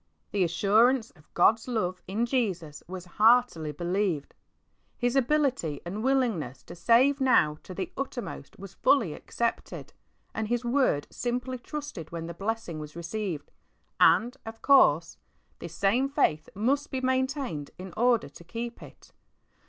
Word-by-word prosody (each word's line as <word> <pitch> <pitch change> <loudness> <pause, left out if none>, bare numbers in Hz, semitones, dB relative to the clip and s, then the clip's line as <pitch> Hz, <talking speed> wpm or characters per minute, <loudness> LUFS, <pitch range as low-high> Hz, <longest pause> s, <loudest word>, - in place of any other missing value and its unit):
The 200 -2 +2
assurance 220 +8 +3
of 150 -4 -24
God's 220 +6 +4
love 185 -7 -2
in 210 +5 0
Jesus 185 - -2
was 185 0 -7 0.2
heartily 225 -9 +4
believed. 175 -1 -2 0.7
Plis 245 +1 0
ability 265 - +1
and 200 +5 -4
willingness 230 - 0
to - - -11
save 260 +9 +4
now 155 -13 +3
to 185 - -10
the 185 -1 -4
uttermost 245 - -6
was 195 0 -10
fully 260 - +2
accepted, 235 +8 -4 0.4
and 220 -1 -2
His 240 +1 -1
word 240 - +2
simply 250 +1 -3
trusted 285 - -7
when 165 -1 -5
the 170 - -6
blessing 200 -3 -4
was 150 0 -9
received; 170 -1 -4 0.5
and, 240 +3 +5
of 225 0 -10
course, 170 - +4 0.4
this 170 -1 -8
same 235 +10 +2
faith 155 - +1
must 275 +8 0
be 265 - -2
maintained 260 - -1
in 185 0 -9
order 235 -7 +2
to 145 +4 -14
keep 235 +7 -6
it. - - -14
220 Hz, 145 wpm, -28 LUFS, 170-250 Hz, 0.7 s, and